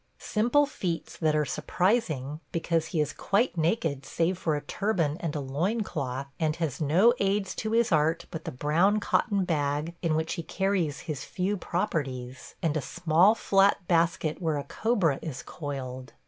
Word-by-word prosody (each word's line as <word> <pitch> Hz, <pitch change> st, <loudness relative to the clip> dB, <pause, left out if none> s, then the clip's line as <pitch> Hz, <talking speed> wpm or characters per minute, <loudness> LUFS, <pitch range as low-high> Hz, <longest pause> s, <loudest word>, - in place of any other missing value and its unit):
Simple 240 Hz, +7 st, +2 dB
feats 180 Hz, -, -4 dB
that 155 Hz, -2 st, +2 dB
are 150 Hz, -1 st, +2 dB
surprising, 155 Hz, -, 0 dB
because 165 Hz, -1 st, 0 dB
he 165 Hz, -, -2 dB
is 150 Hz, -1 st, 0 dB
quite 210 Hz, +4 st, +1 dB
naked 160 Hz, -4 st, 0 dB
save 170 Hz, +6 st, 0 dB
for 165 Hz, -4 st, -1 dB
a 145 Hz, -, -2 dB
turban 165 Hz, -2 st, 0 dB
and 160 Hz, -3 st, -3 dB
a -, -, -1 dB
loin 160 Hz, -, -1 dB
cloth, 140 Hz, -8 st, -3 dB
and 155 Hz, -2 st, +1 dB
has 160 Hz, -4 st, -3 dB
no 180 Hz, +11 st, +5 dB
aids 195 Hz, -1 st, 0 dB
to 220 Hz, 0 st, -2 dB
his 230 Hz, -2 st, +3 dB
art 160 Hz, +1 st, +2 dB
but 160 Hz, -1 st, -6 dB
the 165 Hz, -, -3 dB
brown 165 Hz, +10 st, +2 dB
cotton 205 Hz, -2 st, +1 dB
bag 150 Hz, 0 st, -1 dB
in 165 Hz, -3 st, +1 dB
which 160 Hz, +1 st, -1 dB
he 170 Hz, -, -3 dB
carries 185 Hz, -4 st, -1 dB
his 155 Hz, -5 st, -5 dB
few 195 Hz, +2 st, -1 dB
properties, 135 Hz, -10 st, -3 dB
and 160 Hz, -2 st, +1 dB
a 155 Hz, -, 0 dB
small 175 Hz, +8 st, +3 dB
flat 195 Hz, -3 st, +3 dB
basket 165 Hz, -1 st, +1 dB
where 160 Hz, -3 st, 0 dB
a 140 Hz, -, -3 dB
cobra 180 Hz, -, +1 dB
is 150 Hz, -5 st, -6 dB
coiled. 130 Hz, -4 st, -6 dB
165 Hz, 175 wpm, -28 LUFS, 150-195 Hz, -, no